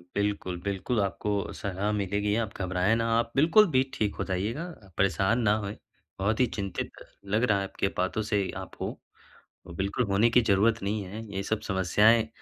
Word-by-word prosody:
बिल्कुल, 100 -3 -1
बिल्कुल 100 +4 -1
आपको 100 +1 -2 0.2
सलाह 100 +1 -2
मिलेगी 105 0 0
आप 110 - -6
घबराएँ 95 +3 +1
ना, 115 0 0
आप 115 0 -2
बिल्कुल 165 +9 +6
भी 130 - +5
ठीक 105 -2 -1
हो - - -2
जाइएगा 100 - -2 0.2
अ, 95 - -17
परेशान 100 +5 +2
ना 105 -2 +3
होएँ, 100 +1 -5 0.4
बहुत 105 +3 0
ही 130 - +5
चिंतित 100 -2 -3 0.3
लग 105 +4 +1
रहा 110 -5 +3
है - - -1
आपके 95 0 -2
बातों 95 +4 0
से 100 -3 +1
आप - - -12
हो। - - -4 0.8
बिल्कुल 100 +5 0
होने 100 +3 +3
की 125 - +5
ज़रूरत 110 +2 +2
नहीं 105 +2 -1
है, 105 +4 -7
ये 95 - -1
सब 110 +2 -1
समस्याएँ 105 +4 +3
100 Hz, 185 wpm, -28 LUFS, 95-110 Hz, 0.8 s, बिल्कुल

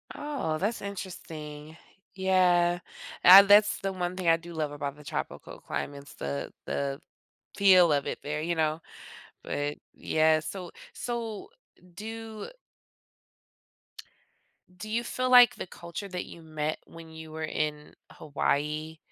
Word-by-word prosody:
Oh, 280 - -3
that's 210 +8 -2
interesting. 160 -6 -8 0.4
Yeah, 180 -2 +3 0.4
ah, 190 +2 +11
that's 205 +1 +5
the 195 0 -3
one 180 -1 -3
thing 185 -2 -3
I 165 0 +6
do 170 +1 -11
love 155 -2 -2
about 145 -1 -4
the 150 - -13
tropical - - -6
climates, 140 0 -6
the 70 0 -4
the 140 0 -2 0.6
feel 185 -4 +6
of 140 -1 0
it - - -4
there 150 +1 -3
you 170 +2 -1
know? 155 0 0 0.6
But 145 0 -3 0.2
yeah, 155 0 +2
so, 180 +1 -7 0.2
so, 235 - -5 0.5
do 220 - -7 2.3
do 215 +4 -8
you 230 +2 0
feel 255 +1 -2
like 245 -2 +8
the - - -6
culture 170 +4 -8
that 180 -2 -5
you 170 - -12
met 155 -1 -3
when 165 -1 -12
you 160 0 -10
were 160 0 -5
in 150 -1 -3 0.2
Hawaii, 150 +2 -2
165 Hz, 135 wpm, -28 LUFS, 155-195 Hz, 2.3 s, ah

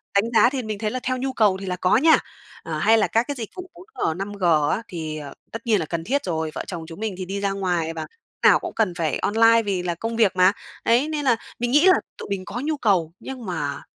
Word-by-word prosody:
đánh 200 - +5
giá 240 - +6
thì 265 -1 -3
mình 215 -2 -4
thấy 215 -1 -1
là 255 - -2
theo 255 0 -1
nhu 265 +1 -3
cầu 210 -6 +3
thì 195 - -7
là 180 -1 -2
có 180 +1 +3
nha. 315 +5 +6 0.5
Ờ, - - -4
hay 225 +1 +4
là 215 - +2
các 230 +2 +1
cái 285 - -3
dịch 230 -5 -6
vụ 370 0 -8
4G, 365 - -3
5G 200 0 -5 0.3
á 220 - -1
thì, 160 -4 -5
à, 145 -2 -8 0.2
tất 230 +1 -8
nhiên 215 -3 +3
là 165 - -2
cần 165 +1 -4
thiết 280 +10 0
rồi, 160 -3 -2
vợ - - -3
chồng 170 -3 -6
chúng 165 +2 -10
mình 215 -3 -3
thì 185 - -4
đi 195 +2 -4
ra 200 -1 0
ngoài 175 -4 -1
và 160 - -5
lúc - - -7 0.4
nào - - +5
cũng - - -6
cần 215 -6 +1
phải 160 -5 -1
online 225 +2 +4
vì 190 -3 -1
là 175 -1 -2
công 225 +6 -4
việc 215 -5 +3
mà. 185 +1 +5 0.3
Đấy, 245 +6 +3
nên 300 -2 -2
là 245 -3 +4 0.2
mình 240 0 -1
nghĩ 295 +6 +5
là 375 - +8 0.2
tụi - - -8
mình 195 -2 -3
có 240 - -5
nhu 310 0 -1
cầu 185 - +1
nhưng 260 -3 -8
mà 145 -6 -3
205 Hz, 275 wpm, -23 LUFS, 180-240 Hz, 0.5 s, là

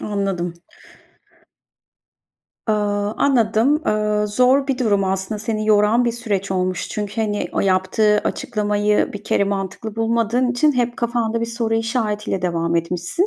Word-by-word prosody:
anladım. 195 -4 -2 2.1
Aaa, 205 -1 0
anladım. 250 +2 +2
Aaa, 210 0 +1
zor 255 +6 +3
bir 270 -2 -1
durum 205 -6 +2
aslında. 190 +2 -2
Seni 215 0 -2
yoran 215 +3 +4
bir 235 - +1
süreç 205 -5 -3
olmuş 185 -1 -1
çünkü, 210 +1 -4
hani, 210 -2 -1
o - - 0
yaptığı 195 +3 +2
açıklamayı 210 -5 0
bir 205 0 -8
kere 200 - +2
mantıklı 200 +2 -4
bulmadığın 230 +2 +1
için 275 +5 +3
hep 245 -2 -1
kafanda 235 -1 -1
bir 230 - -1
soru 230 -1 -2
işaretiyle 220 -4 -1
devam 170 -1 0
etmişsin. 175 - -1
210 Hz, 135 wpm, -20 LUFS, 200-235 Hz, 2.1 s, yoran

